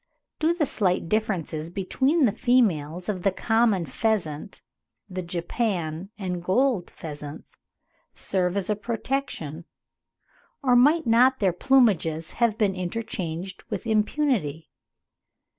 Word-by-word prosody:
Do 325 +2 +2
the 325 -4 +1
slight 185 -9 0
differences 175 -7 -1
between 260 - +1
the 220 - +3
females 185 - +1
of 195 -4 -2
the 195 - +3
common 225 -3 +2
pheasant, 170 - -2 0.4
the 185 -2 -4
Japan 175 -1 -2
and 180 -4 -4
gold 220 0 +1
pheasants, 150 -1 -8 0.6
serve 180 0 0
as 195 - -1
a 210 - +1
protection, 215 - -3 1.0
or 250 -2 +4
might 295 +6 +5
not 245 +3 +5
their 190 -6 +2
plumages 180 - +2
have 225 -2 +3
been 210 -4 +2
interchanged 185 -2 -4
with - - -4
impunity? 215 - 0
195 Hz, 115 wpm, -25 LUFS, 170-235 Hz, 1.0 s, might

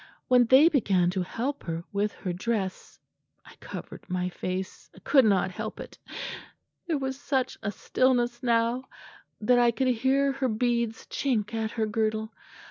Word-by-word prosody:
When 250 -1 +6
they 265 +7 +7
began 195 - +2
to 185 0 -1
help 250 +10 -3
her 165 0 -3
with 205 +1 +1
her 180 - -4
dress 195 0 -3 0.5
I - - -14
covered - - -9
my 180 0 -1
face 185 +1 -5
I - - -13
could 265 -4 +5
not 195 -3 +3
help 215 +3 -6
it. - - -10 0.9
There 325 -3 +1
was 265 -1 -3
such 260 -3 0
a 200 - -2
stillness 240 +2 +1
now 235 +1 +1 0.6
that 245 +3 +4
I 240 -1 +5
could 255 +2 +1
hear 265 +3 +2
her 270 -1 -1
beads 235 0 0
chink 235 -5 -1
at 220 -1 -1
her 220 -2 0
girdle. 220 0 -1
230 Hz, 160 wpm, -27 LUFS, 205-255 Hz, 0.9 s, they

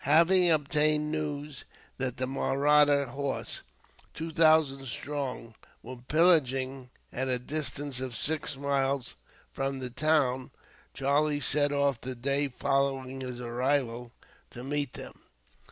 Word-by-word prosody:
Having 170 +5 +5
obtained 150 0 +1
news 150 -2 -4 0.4
that 130 0 -2
the 130 - -1
Mahratta 140 +2 +3
horse, 140 +2 -4 0.5
two 160 +1 -5
thousand 155 -4 +3
strong, 130 -3 -4 0.3
were 125 +2 -8
pillaging 135 -3 +2 0.2
at 130 +1 -2
a 130 -1 +1
distance 145 0 -3
of 130 -2 -5
six 150 +3 -1
miles 135 -2 -1 0.4
from 135 0 -3
the 130 -2 -6
town, 130 -2 +1 0.5
Charlie 145 +2 +1
set 145 +1 +2
off 140 -3 +1
the 130 0 -5
day 140 +4 0
following 135 0 -1
his 125 -1 -6
arrival 125 -1 -1 0.4
to 120 - -9
meet 145 -1 -2
them. - - -10
140 Hz, 120 wpm, -29 LUFS, 130-150 Hz, 0.5 s, Having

